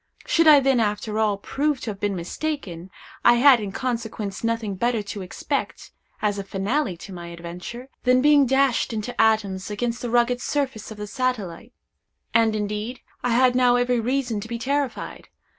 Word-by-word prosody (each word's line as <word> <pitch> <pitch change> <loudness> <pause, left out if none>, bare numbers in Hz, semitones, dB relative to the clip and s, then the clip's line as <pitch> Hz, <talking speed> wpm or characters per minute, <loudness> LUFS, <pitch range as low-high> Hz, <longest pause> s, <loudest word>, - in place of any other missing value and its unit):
Should 330 -1 +3
I 300 -2 +9
then, 270 -2 +2
after 210 0 -1
all, 210 -2 +2
prove 285 +7 -1
to 220 - -3
have 195 - -10
been 205 -1 -1
mistaken, 185 - -4 0.3
I 240 - +7
had 255 0 +6
in 205 -2 -4
consequence 225 -4 -4
nothing 230 -3 -1
better 230 +2 0
to 200 0 -6
expect, 185 - -4 0.3
as 205 -1 +1
a - - -3
finale 195 - -1
to 190 +3 -10
my 175 -1 -8
adventure, 175 +9 -8
than 250 0 +4
being 285 0 +5
dashed 265 -2 +2
into 220 +3 -4
atoms 205 -3 +1
against 235 +3 -2
the 245 - -3
rugged 245 +1 +2
surface 265 -7 -2
of 220 - -9
the 210 - -5
satellite. 210 -5 -3 0.6
And, 225 -2 +3
indeed, 210 +4 -3 0.2
I 245 - +1
had 250 +1 +4
now 250 -1 +4
every 245 0 +2
reason 245 -2 -1
to 210 - -7
be 235 0 -4
terrified. 275 +2 -3
230 Hz, 175 wpm, -24 LUFS, 205-255 Hz, 0.6 s, I